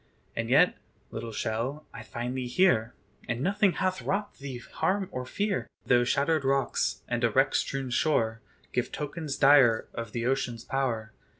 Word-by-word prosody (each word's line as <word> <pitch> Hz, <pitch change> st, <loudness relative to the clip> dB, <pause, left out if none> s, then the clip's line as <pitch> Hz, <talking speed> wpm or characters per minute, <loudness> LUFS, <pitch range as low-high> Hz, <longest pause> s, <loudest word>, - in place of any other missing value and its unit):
And -, -, -2 dB
yet, -, -, +4 dB, 0.3 s
little 115 Hz, -, -5 dB
shell, 115 Hz, +7 st, -3 dB
I -, -, -8 dB
find 120 Hz, +3 st, -5 dB
thee 130 Hz, -1 st, -2 dB
here, 120 Hz, -6 st, +2 dB, 0.3 s
And 120 Hz, -1 st, -2 dB
nothing 195 Hz, +3 st, +2 dB
hath 185 Hz, 0 st, -1 dB
wrought 200 Hz, +2 st, -2 dB
thee 135 Hz, -2 st, -6 dB
harm 185 Hz, +10 st, -1 dB
or 125 Hz, 0 st, -5 dB
fear; 205 Hz, +4 st, -1 dB, 0.2 s
Though 120 Hz, -1 st, +4 dB
shattered 145 Hz, +4 st, +1 dB
rocks, 135 Hz, 0 st, 0 dB
and -, -, -2 dB
a -, -, +4 dB
wreck -, -, +3 dB
strewn 135 Hz, -2 st, -1 dB
shore, 115 Hz, -5 st, +1 dB, 0.3 s
Give 125 Hz, 0 st, -1 dB
tokens 150 Hz, 0 st, -4 dB
dire 135 Hz, -5 st, +5 dB
of 115 Hz, -2 st, -5 dB
the 115 Hz, +1 st, -3 dB
ocean's 120 Hz, -3 st, -1 dB
power. 115 Hz, -5 st, -2 dB
135 Hz, 165 wpm, -28 LUFS, 120-155 Hz, 0.3 s, dire